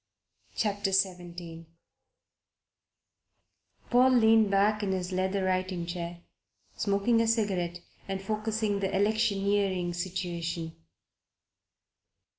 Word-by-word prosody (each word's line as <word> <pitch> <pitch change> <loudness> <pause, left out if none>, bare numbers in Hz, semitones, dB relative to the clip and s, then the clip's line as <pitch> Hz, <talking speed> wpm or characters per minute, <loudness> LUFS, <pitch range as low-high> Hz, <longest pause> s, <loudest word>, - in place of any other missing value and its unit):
CHAPTER 205 -2 -1
XVII 175 -3 -2 2.2
PAUL 250 +2 +6
leaned 225 -4 +5
back 205 +2 +2
in 195 -2 0
his 185 0 -3
leather 190 +1 0
writing 185 -1 -1
chair, 170 0 -6 0.5
smoking 205 +3 +2
a 230 - +1
cigarette 190 -6 0 0.3
and 195 0 -3
focussing 215 0 -1
the 195 -1 -1
electioneering 200 -3 +1
situation. 170 -2 -4
195 Hz, 85 wpm, -29 LUFS, 175-210 Hz, 2.2 s, PAUL